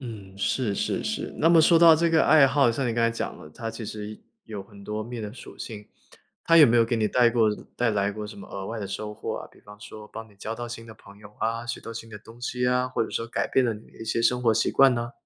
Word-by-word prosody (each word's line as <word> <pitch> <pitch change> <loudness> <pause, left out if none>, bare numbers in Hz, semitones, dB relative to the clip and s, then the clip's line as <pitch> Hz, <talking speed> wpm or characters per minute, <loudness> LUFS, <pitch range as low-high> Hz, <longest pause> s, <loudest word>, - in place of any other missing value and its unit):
嗯， 105 -6 -9
是， 105 0 -1
是， - - -1
是。 - - -3
那 165 - +4
么 170 -1 +6
说 165 +1 +5
到 165 -2 +8
这 170 +1 +2
个 160 - +4
爱 150 -2 +7
好， 135 -3 +3
像 130 +2 -2
你 115 - 0
刚 115 0 0
才 115 - +3
讲 115 - -5
的， 75 - -11
它 115 +8 -6
其 115 - -8
实 105 0 -7 0.2
有 105 -3 -7
很 100 0 -15
多 105 +1 -3
面 120 0 -6
的 105 0 -6
属 130 - -12
性， 105 -2 -8 0.6
它 165 0 +6
有 150 - +9
没 120 +1 +3
有 115 - +5
给 115 - -1
你 110 -1 +1
带 120 -2 +4
过 115 -2 +3 0.3
带 120 - +1
来 100 -2 0
过 105 0 -6
什 105 - -10
么 - - -10
额 95 -1 -7
外 115 0 -5
的 100 - -4
收 105 +2 -5
获 - - -5
啊， - - -9
比 - - -22
方 105 0 -15
说 110 -1 -10
帮 115 0 -9
你 100 - -22
交 110 +3 -5
到 120 0 -6
新 115 -1 -8
的 110 - -10
朋 100 -1 -17
友 105 0 -15
啊， 115 +1 -1
学 120 - -4
到 115 - -8
新 115 0 -8
的 105 - -8
东 115 +3 -15
西 125 0 -2
啊， 125 0 +1
或 130 - -1
者 - - -4
说 115 - -3
改 115 - -2
变 130 - +3
了 115 - +1
你 105 +1 -12
的 - - -19
一 115 - -7
些 115 +1 -1
生 125 +1 +2
活 115 -2 +4
习 110 - +1
惯 135 -2 +5
呢？ 120 0 -4
115 Hz, 320 characters per minute, -25 LUFS, 105-125 Hz, 0.6 s, 有